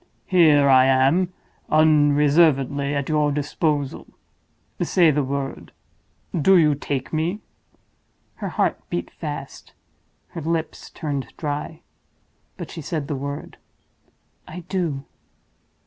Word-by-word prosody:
Here 155 Hz, -6 st, +5 dB
I 130 Hz, -1 st, +6 dB
am, 135 Hz, +8 st, +3 dB, 0.4 s
unreservedly 145 Hz, -2 st, +3 dB
at 140 Hz, -1 st, -2 dB
your 150 Hz, -2 st, +1 dB
disposal. 145 Hz, -1 st, -2 dB, 0.7 s
Say 170 Hz, -4 st, +4 dB
the 145 Hz, 0 st, 0 dB
word—do 140 Hz, +5 st, -2 dB
you 155 Hz, -3 st, +4 dB
take 140 Hz, -1 st, -4 dB
me?" 170 Hz, +7 st, -1 dB, 1.0 s
Her -, -, -4 dB
heart -, -, 0 dB
beat -, -, -4 dB
fast; -, -, -8 dB, 0.6 s
her 170 Hz, -, -7 dB
lips 165 Hz, +1 st, -3 dB
turned 145 Hz, -4 st, -4 dB
dry—but 150 Hz, +1 st, -9 dB
she 165 Hz, -, -7 dB
said 150 Hz, -1 st, -4 dB
the 145 Hz, -, -1 dB
word. 140 Hz, +1 st, -6 dB, 0.9 s
"I 180 Hz, +3 st, -8 dB
do." 170 Hz, -6 st, -3 dB
150 Hz, 100 wpm, -22 LUFS, 140-165 Hz, 1.0 s, I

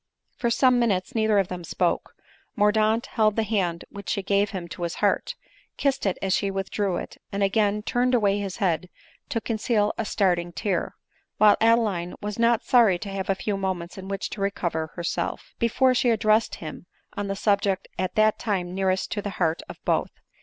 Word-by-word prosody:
For 235 Hz, -, 0 dB
some 250 Hz, +1 st, +4 dB
minutes 230 Hz, 0 st, 0 dB
neither 220 Hz, -2 st, +2 dB
of 195 Hz, -2 st, +3 dB
them 180 Hz, -1 st, -6 dB
spoke; 165 Hz, -, -1 dB, 0.4 s
Mordaunt 215 Hz, +2 st, +3 dB
held 215 Hz, -4 st, +1 dB
the 225 Hz, -, +1 dB
hand 190 Hz, -6 st, -1 dB
which 200 Hz, -1 st, -8 dB
she 200 Hz, -, -1 dB
gave 200 Hz, +1 st, +2 dB
him 185 Hz, -4 st, -5 dB
to 175 Hz, -, -8 dB
his 170 Hz, -1 st, -2 dB
heart, -, -, 0 dB, 0.4 s
kissed 270 Hz, -6 st, 0 dB
it 190 Hz, -, 0 dB
as 190 Hz, -1 st, +1 dB
she 200 Hz, -, +1 dB
withdrew 195 Hz, -1 st, -1 dB
it, -, -, -7 dB
and 200 Hz, 0 st, -1 dB
again 210 Hz, +1 st, +1 dB
turned 250 Hz, +2 st, +1 dB
away 205 Hz, -3 st, +2 dB
his 195 Hz, -2 st, -4 dB
head 180 Hz, -4 st, 0 dB, 0.4 s
to 250 Hz, -5 st, 0 dB
conceal 220 Hz, -2 st, 0 dB
a 225 Hz, -, 0 dB
starting 175 Hz, -4 st, +1 dB
tear; 190 Hz, -3 st, -2 dB, 0.4 s
while 210 Hz, -1 st, +6 dB
Adeline 220 Hz, -6 st, +2 dB
was 210 Hz, +1 st, -5 dB
not 235 Hz, 0 st, +3 dB
sorry 230 Hz, -8 st, +5 dB
to 200 Hz, +3 st, -7 dB
have 195 Hz, -1 st, -4 dB
a 195 Hz, -, +3 dB
few 200 Hz, +1 st, -2 dB
moments 185 Hz, -3 st, -3 dB
in 190 Hz, 0 st, -8 dB
which 195 Hz, -1 st, -4 dB
to 205 Hz, -, -6 dB
recover 175 Hz, -5 st, -1 dB
herself, 170 Hz, 0 st, -3 dB
before 255 Hz, +3 st, +3 dB
she 245 Hz, 0 st, +2 dB
addrsessed 220 Hz, 0 st, +2 dB
him 160 Hz, +2 st, -9 dB, 0.3 s
on 205 Hz, -2 st, -3 dB
the 195 Hz, -, -2 dB
subject 200 Hz, -1 st, +1 dB
at 185 Hz, 0 st, -2 dB
that 215 Hz, 0 st, +3 dB
time 185 Hz, -5 st, -2 dB
nearest 190 Hz, 0 st, 0 dB
to 205 Hz, -, -2 dB
the 205 Hz, -, -4 dB
heart 165 Hz, -2 st, +1 dB
of -, -, -8 dB
both. -, -, +1 dB
200 Hz, 195 wpm, -25 LUFS, 185-220 Hz, 0.4 s, while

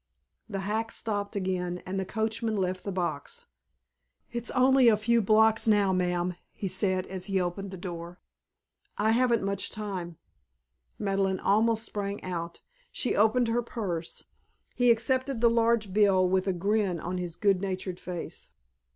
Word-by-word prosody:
The 195 Hz, -3 st, -3 dB
hack 220 Hz, +3 st, -2 dB
stopped 205 Hz, -2 st, -3 dB
again 180 Hz, -2 st, -2 dB
and 190 Hz, +1 st, -3 dB
the 190 Hz, -, -2 dB
coachman 220 Hz, +2 st, -1 dB
left 185 Hz, -1 st, -1 dB
the 200 Hz, -, -3 dB
box. 195 Hz, -, -4 dB, 0.9 s
"It's 235 Hz, 0 st, -1 dB
only 260 Hz, 0 st, +5 dB
a 220 Hz, -2 st, +6 dB
few 230 Hz, +2 st, +2 dB
blocks 220 Hz, +2 st, +4 dB
now, 205 Hz, -3 st, +4 dB
ma'am," 180 Hz, 0 st, 0 dB, 0.2 s
he 200 Hz, -, -4 dB
said, 185 Hz, 0 st, 0 dB
as 185 Hz, -1 st, -4 dB
he 195 Hz, -1 st, 0 dB
opened 185 Hz, +2 st, -3 dB
the 190 Hz, -, -8 dB
door. 175 Hz, -1 st, -7 dB, 0.8 s
"I 215 Hz, +2 st, +2 dB
haven't 235 Hz, -1 st, +3 dB
much 200 Hz, 0 st, -1 dB
time 185 Hz, -6 st, -5 dB, 0.4 s
" 65 Hz, 0 st, -48 dB
Madeleine 195 Hz, -2 st, 0 dB
almost 220 Hz, +2 st, +2 dB
sprang 200 Hz, -2 st, -4 dB
out. 170 Hz, -2 st, -5 dB, 0.3 s
She 250 Hz, -, 0 dB
opened 225 Hz, +3 st, +3 dB
her 235 Hz, +1 st, +1 dB
purse. 185 Hz, -8 st, -4 dB, 0.5 s
He 245 Hz, -1 st, +3 dB
accepted 255 Hz, +2 st, +1 dB
the 235 Hz, 0 st, +4 dB
large 230 Hz, -4 st, +2 dB
bill 195 Hz, -3 st, +4 dB
with 185 Hz, +1 st, +1 dB
a 190 Hz, -, +2 dB
grin 195 Hz, 0 st, 0 dB
on 180 Hz, +3 st, -3 dB
his 175 Hz, -2 st, -4 dB
good 195 Hz, -2 st, +2 dB
natured 185 Hz, -2 st, -3 dB
face. 180 Hz, -2 st, -6 dB
200 Hz, 160 wpm, -28 LUFS, 185-225 Hz, 0.9 s, a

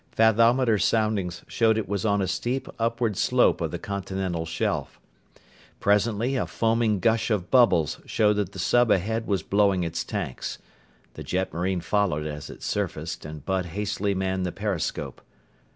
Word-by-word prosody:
Fathometer 115 Hz, +1 st, +4 dB
soundings 105 Hz, -6 st, 0 dB
showed 110 Hz, -1 st, +2 dB
it 110 Hz, -, -2 dB
was 100 Hz, -1 st, -2 dB
on 100 Hz, -1 st, +2 dB
a -, -, -1 dB
steep 120 Hz, +9 st, -2 dB
upward 115 Hz, -1 st, 0 dB
slope -, -, +3 dB
of -, -, -1 dB
the -, -, -4 dB
continental 95 Hz, -4 st, -3 dB
shelf. -, -, -2 dB, 0.8 s
Presently 110 Hz, +5 st, +1 dB
a 130 Hz, -, -1 dB
foaming 115 Hz, -2 st, +1 dB
gush 115 Hz, +4 st, +2 dB
of 100 Hz, -5 st, -1 dB
bubbles 115 Hz, -, +4 dB
showed 105 Hz, -1 st, +3 dB
that 100 Hz, -3 st, -1 dB
the 95 Hz, -, -11 dB
sub 120 Hz, +5 st, +3 dB
ahead 110 Hz, +4 st, +1 dB
was 95 Hz, -5 st, 0 dB
blowing 100 Hz, -3 st, +2 dB
its 85 Hz, -1 st, -2 dB
tanks. -, -, -4 dB, 0.6 s
The -, -, -8 dB
jetmarine 90 Hz, 0 st, -1 dB
followed 90 Hz, -7 st, 0 dB
as 75 Hz, -1 st, -6 dB
it -, -, -11 dB
surfaced -, -, -3 dB
and 75 Hz, -2 st, -8 dB
Bud 95 Hz, -1 st, 0 dB
hastily 100 Hz, +2 st, -2 dB
manned 95 Hz, 0 st, -1 dB
the 90 Hz, -, -2 dB
periscope. 100 Hz, -4 st, -3 dB
100 Hz, 155 wpm, -25 LUFS, 90-110 Hz, 0.8 s, Fathometer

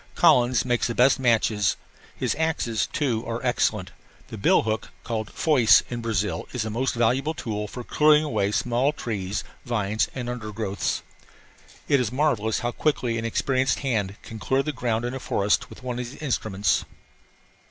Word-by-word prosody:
Collins 125 Hz, -1 st, +4 dB
makes 120 Hz, -1 st, +1 dB
the 115 Hz, -, -3 dB
best 130 Hz, +3 st, +4 dB
machetes. 110 Hz, -4 st, +2 dB, 0.4 s
His -, -, -1 dB
axes, 115 Hz, -, 0 dB
too, 125 Hz, -6 st, -1 dB
are 115 Hz, 0 st, -2 dB
excellent. 110 Hz, -6 st, 0 dB, 0.4 s
The 110 Hz, -, -7 dB
bill -, -, +4 dB
hook, 110 Hz, 0 st, -2 dB
called 110 Hz, -3 st, -3 dB
foice 120 Hz, -9 st, +5 dB
in 120 Hz, -1 st, -3 dB
Brazil, 105 Hz, -3 st, -1 dB
is 120 Hz, -4 st, -2 dB
a 110 Hz, -, -3 dB
most 125 Hz, +4 st, -1 dB
valuable 130 Hz, +7 st, +1 dB
tool 105 Hz, -5 st, -4 dB
for 125 Hz, +4 st, -7 dB
clearing 150 Hz, +3 st, +4 dB
away 105 Hz, -9 st, 0 dB
small 125 Hz, +6 st, +1 dB
trees, 105 Hz, -6 st, -3 dB, 0.2 s
vines, 110 Hz, -3 st, 0 dB
and 125 Hz, -2 st, -4 dB
under 120 Hz, -3 st, -5 dB
growths. 100 Hz, -3 st, -2 dB, 0.8 s
It 140 Hz, -, +4 dB
is 120 Hz, -4 st, -1 dB
marvellous 125 Hz, -6 st, +1 dB
how 120 Hz, -, -1 dB
quickly 120 Hz, -5 st, 0 dB
an 115 Hz, -, -4 dB
experienced 130 Hz, +3 st, 0 dB
hand 105 Hz, -8 st, -1 dB
can 110 Hz, -, -9 dB
clear 135 Hz, +5 st, +1 dB
the 150 Hz, -, -2 dB
ground 120 Hz, -2 st, -1 dB
in 120 Hz, -, -3 dB
a 135 Hz, -, -4 dB
forest 100 Hz, -4 st, 0 dB
with -, -, -13 dB
one 125 Hz, -1 st, -3 dB
of 125 Hz, -, -3 dB
these 140 Hz, -, -12 dB
instruments. 110 Hz, -9 st, 0 dB
120 Hz, 175 wpm, -25 LUFS, 110-130 Hz, 0.8 s, foice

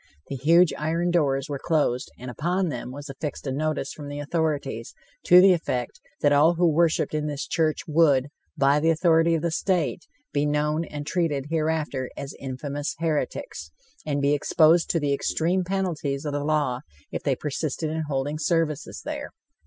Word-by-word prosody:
The 140 Hz, -, -3 dB
huge 165 Hz, +6 st, +4 dB
iron 165 Hz, +3 st, 0 dB
doors 140 Hz, -4 st, +1 dB
were 140 Hz, -2 st, -5 dB
closed, 145 Hz, -6 st, 0 dB
and 125 Hz, +1 st, -7 dB
upon 175 Hz, -, -1 dB
them 125 Hz, -3 st, -5 dB
was 145 Hz, +3 st, -8 dB
affixed 140 Hz, +1 st, -6 dB
a 135 Hz, -, -2 dB
notice 150 Hz, 0 st, -2 dB
from 145 Hz, -2 st, -9 dB
the 145 Hz, 0 st, -6 dB
authorities, 145 Hz, -6 st, -2 dB, 0.3 s
to 180 Hz, -, +8 dB
the 190 Hz, 0 st, +7 dB
effect 125 Hz, -8 st, -3 dB, 0.2 s
that 145 Hz, -, +4 dB
all 155 Hz, +4 st, +5 dB
who 175 Hz, +1 st, +3 dB
worshiped 165 Hz, 0 st, +2 dB
in 150 Hz, 0 st, -1 dB
this 145 Hz, -2 st, -3 dB
church 160 Hz, -2 st, 0 dB
would, 145 Hz, -4 st, +3 dB, 0.3 s
by 140 Hz, +1 st, +4 dB
the 160 Hz, +2 st, +2 dB
authority 165 Hz, 0 st, +3 dB
of 160 Hz, -, -2 dB
the 170 Hz, -, 0 dB
state, 175 Hz, 0 st, -1 dB, 0.3 s
be 145 Hz, -, +1 dB
known 150 Hz, +2 st, 0 dB
and 145 Hz, -1 st, -7 dB
treated 150 Hz, -5 st, -1 dB
hereafter 155 Hz, -5 st, -1 dB
as 140 Hz, -, -6 dB
"infamous 140 Hz, +2 st, -4 dB
heretics," 165 Hz, -, -3 dB, 0.3 s
and 145 Hz, -2 st, -1 dB
be 140 Hz, +1 st, +3 dB
exposed 160 Hz, +3 st, +4 dB
to 165 Hz, -, +2 dB
the 145 Hz, -2 st, 0 dB
extreme 170 Hz, +6 st, 0 dB
penalty 175 Hz, -7 st, -1 dB
of 140 Hz, -, -7 dB
the 145 Hz, -1 st, -2 dB
law 145 Hz, -5 st, 0 dB, 0.3 s
if -, -, -3 dB
they -, -, +1 dB
persisted 155 Hz, +1 st, -3 dB
in 160 Hz, 0 st, -2 dB
holding 145 Hz, +2 st, -2 dB
services 160 Hz, -1 st, -1 dB
there. 295 Hz, -1 st, -4 dB
150 Hz, 175 wpm, -25 LUFS, 140-165 Hz, 0.3 s, to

